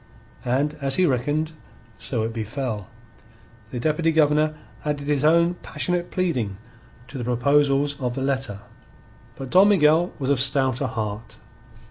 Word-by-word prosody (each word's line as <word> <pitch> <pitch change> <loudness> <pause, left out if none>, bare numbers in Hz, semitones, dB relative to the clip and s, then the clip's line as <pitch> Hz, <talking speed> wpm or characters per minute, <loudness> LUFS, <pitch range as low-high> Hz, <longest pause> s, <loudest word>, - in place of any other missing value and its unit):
And 135 +5 +1
as 135 -1 -1
he 185 - +3
reckoned 145 +3 0 0.5
so 115 -4 -1
it 115 +1 -3
befell. 110 -2 -4 0.8
The 125 - -5
Deputy 155 +5 +1
Governor 155 0 +3 0.3
added 145 -1 -3
his 145 -1 +1
own 170 +3 +4
passionate 175 -1 -2
pleading 125 - -1 0.5
to 135 0 -8
the - - -3
proposals 140 +3 +2
of 125 -1 -2
the 135 - -2
letter. 130 -7 -2 0.7
But 135 -1 -8
Don 190 +3 +6
Miguel 170 -2 +4
was 135 -1 -1
of 140 - +2
stouter 130 -1 +2
heart. 110 -1 -5
140 Hz, 140 wpm, -23 LUFS, 125-155 Hz, 0.8 s, Don